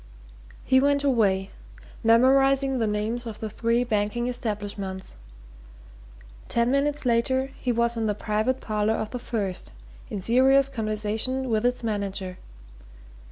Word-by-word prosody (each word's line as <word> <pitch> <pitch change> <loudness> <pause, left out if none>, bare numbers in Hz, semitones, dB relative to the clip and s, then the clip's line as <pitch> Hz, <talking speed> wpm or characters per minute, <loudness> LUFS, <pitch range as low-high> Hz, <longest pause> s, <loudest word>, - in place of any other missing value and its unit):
He 260 -1 +4
went 285 +1 +2
away, 200 -8 +2 0.5
memorizing 270 +3 +4
the 225 - +1
names 220 +3 -2
of 220 - -7
the 220 -1 -5
three 230 +3 +1
banking 220 +1 -1
establishments 205 -5 -4 1.4
ten 235 +1 +2
minutes 285 +1 0
later 260 +3 +1
he 250 - -1
was 235 0 +1
in 225 -1 -1
the 210 - 0
private 215 +5 -1
parlour 215 0 0
of 220 -1 -4
the 250 - -4
first, 200 -6 -4 0.4
in 205 - -4
serious 265 +6 +4
conversation 220 +2 -2
with 220 +2 +2
its 250 0 -2
manager. 200 -4 -3
230 Hz, 130 wpm, -25 LUFS, 210-260 Hz, 1.4 s, He